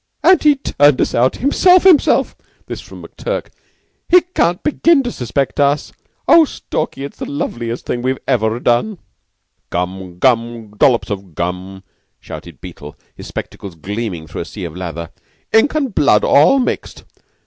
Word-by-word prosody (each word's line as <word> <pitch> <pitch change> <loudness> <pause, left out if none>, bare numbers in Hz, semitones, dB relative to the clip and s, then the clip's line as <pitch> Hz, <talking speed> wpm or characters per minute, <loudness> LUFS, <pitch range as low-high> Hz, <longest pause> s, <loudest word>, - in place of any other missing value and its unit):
"And 370 - +5
he 300 -1 +5
turned 145 - +2
us - - 0
out 125 +2 +2
himself 360 +7 +4
himself 365 -6 +4
him_self_!" - - -38 0.2
This - - -7
from - - -13
McTurk. - - -5 0.6
"He 360 +1 +7
can't 180 - -1
begin 305 0 +3
to 245 - -3
suspect 135 - -3
us. 145 +1 +1 0.4
Oh, 335 - +7
Stalky, 155 - -4
it's 140 - -8
the - - -5
loveliest 120 -4 -4
thing 120 - -3
we've 130 +1 -1
ever 115 -3 0
done." 125 - 0 0.7
"Gum! 90 0 -4
Gum! 115 -1 0
Dollops 120 0 +2
of 95 -5 -6
gum!" 90 +2 -5 0.4
shouted - - -11
Beetle, 75 0 -10 0.2
his - - -10
spectacles 95 -4 -7
gleaming 95 -1 -5
through 80 - -7
a - - -5
sea 100 +2 -9
of 85 -2 -6
lather. 85 -2 -6 0.4
"Ink 225 +8 +3
and 275 -7 -1
blood 140 - +3
all 155 - +5
mixed. 255 - -3
125 Hz, 160 wpm, -17 LUFS, -, 0.7 s, He